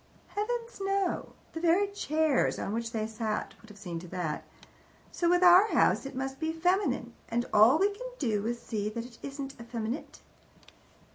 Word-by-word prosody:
Heavens 465 +1 -3
no! 390 -2 -1 0.2
The 325 - -4
very 350 +4 +3
chairs 315 -7 +1
on 200 - -3
which 230 0 -2
they 220 -2 -1
sat 220 -1 -3
would 220 - -16
have 210 - -13
seen 175 -5 -5
to 180 - -10
that. 165 -3 -3 0.7
So 340 - +1
with 355 +1 +4
our 360 +3 +8
house 275 - +3
it 275 - -9
must 265 +1 -4
be 320 0 -1
feminine, 360 +5 0 0.2
and 240 +1 0
all 220 +7 +7
we 395 +4 +3
can - - -7
do 215 -5 0
is 240 0 -2
to - - -21
see 210 -2 -2
that 230 +2 -5
it 240 -2 -14
isn't 275 -1 -6
effeminate. 235 +3 -5
270 Hz, 185 wpm, -30 LUFS, 225-355 Hz, 0.7 s, our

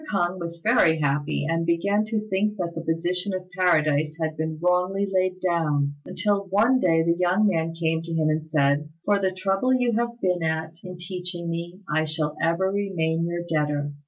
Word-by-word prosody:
K'ung 185 -2 0
was 170 -1 -6
very 210 -8 +4
happy, 145 0 0
and 165 +1 0
began 200 +6 +1
to 215 -1 -3
think 210 +1 0
that 170 -2 -3
the 165 - -5
position 175 +4 -1
of 185 0 -7
Paradise 155 -4 +2
had 160 -1 -2
been 160 0 -3
wrongly 180 +3 +1
laid 185 -1 0
down, 150 -5 +1
until 200 +1 0
one 225 +7 +3
day 165 -5 +3
the 170 0 +2
young 180 +4 +3
man 165 -3 0
came 160 -1 0
to 165 0 -8
him 160 -1 +1
and 155 0 +1
said, 150 -1 +1 0.2
"For 205 -1 +3
the 190 -1 +1
trouble 195 +7 +1
you 245 -1 +1
have 235 +1 -1
been 180 -4 0
at 160 0 -2
in 180 -1 -8
teaching 180 -1 -5
me, 170 +3 -5
I 155 +1 +1
shall 155 -1 -2
ever 180 +3 +1
remain 170 -5 -1
your 170 0 -3
debtor. 150 -2 -1
170 Hz, 190 wpm, -25 LUFS, 160-190 Hz, 0.2 s, very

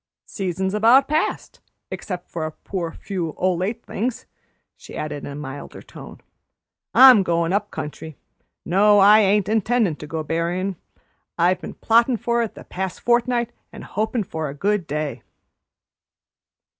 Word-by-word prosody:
Season's 190 0 -3
about 235 +6 +5
past, 305 +2 -2 0.3
except 180 -3 -6
for 160 -2 -4
a - - -6
poor 170 +1 -5
few 175 -5 -5
o' 185 0 +1
late 200 +7 -3
things," 235 +4 -3 0.5
she - - -11
added 150 -1 -5
in - - -6
a - - -7
milder 145 -1 -8
tone. - - -12 0.8
"I'm 255 -5 +9
goin' 170 -1 0
up 200 - 0
country. 150 0 -7 0.5
No, 205 +4 +4
I 205 +2 +7
ain't 205 -1 +3
intendin' 220 -5 +1
to 150 - -9
go 160 +1 -4
berryin'. 175 +5 -2 0.6
I've 180 +2 +2
been - - -8
plottin' 235 +2 +3
for 235 +1 0
it 230 - -4
the - - -11
past 190 0 -5
fortnight 240 0 +1 0.2
and - - -10
hopin' 220 +2 -2
for 160 -4 -4
a 140 - -8
good 195 +2 0
day." 150 0 -3
190 Hz, 150 wpm, -22 LUFS, 165-225 Hz, 0.8 s, I'm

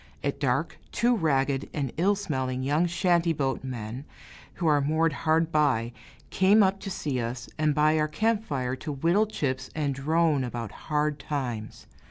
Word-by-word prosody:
At - - -2
dark, - - -1
two 240 +1 +2
ragged 140 - 0
and 140 -4 -2
ill 195 +5 +3
smelling 130 -9 -2
young 150 +6 +2
shanty 175 -1 +2
boat 135 -4 -2
men, 125 -1 -5 0.5
who 175 - -3
are 150 -2 +4
moored 155 +2 +1
hard 160 +2 +1
by, 130 -7 +2 0.4
came 200 +3 +5
up 195 0 +1
to 195 - -6
see 145 -8 -2
us, 120 +1 -4
and 155 -2 +2
by 155 +1 +3
our 155 - +2
camp 220 +7 0
fire 130 - -2
to 150 +3 -5
whittle 170 +10 +2
chips 135 -9 -3
and 145 -3 0
drone 150 +1 +1
about 120 -3 -5 0.2
hard 150 -1 +1
times. 125 -8 -4
150 Hz, 170 wpm, -27 LUFS, 130-165 Hz, 0.5 s, came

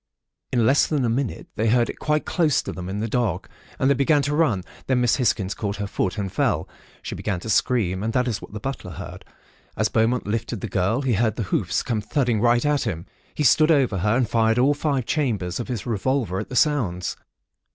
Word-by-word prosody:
In 120 -3 +2
less 135 +5 +4
than 145 -5 0
a - - +1
minute, 125 +1 -2
they 110 +1 0
heard 120 0 +3
it - - -7
quite 150 0 0
close 160 -6 +1
to - - -5
them 90 0 -6
in 100 +2 -3
the 115 - -1
dark, 110 -6 -1 0.3
and 130 - +1
they 140 - +5
began 140 +2 +2
to 145 +1 -1
run. 125 - +2 0.2
Then 130 -1 +2
Miss 120 -2 +2
Hisgins 110 -6 +1
caught 100 -2 -3
her 105 - -3
foot, 95 0 -2
and 100 -3 -3
fell. - - 0 0.4
She - - -5
began 100 -5 -3
to 110 - -3
scream, 100 -7 +1
and 110 +2 -1
that 125 0 +1
is 110 -4 -2
what - - -11
the 105 - -6
butler 100 -7 -5
heard. - - -8 0.5
As - - +1
Beaumont 115 +3 +1
lifted 115 0 -3
the - - -3
girl, 100 +7 0
he 130 -3 +1
heard 110 0 +1
the 115 - -2
hoofs - - 0
come 115 -3 -1
thudding 120 -2 0
right 120 +1 +3
at 145 -1 +2
him. 85 -4 -3 0.3
He 150 - -1
stood 155 +4 +5
over 135 - +3
her, 105 +5 +2
and 125 -3 +1
fired 115 0 +2
all 135 +4 +4
five 140 -4 -1
chambers 110 - -1
of 120 - -4
his 120 -5 -4
revolver 115 -3 -1
at - - -6
the 130 - -6
sounds. 115 - +1
115 Hz, 230 wpm, -23 LUFS, 105-135 Hz, 0.5 s, they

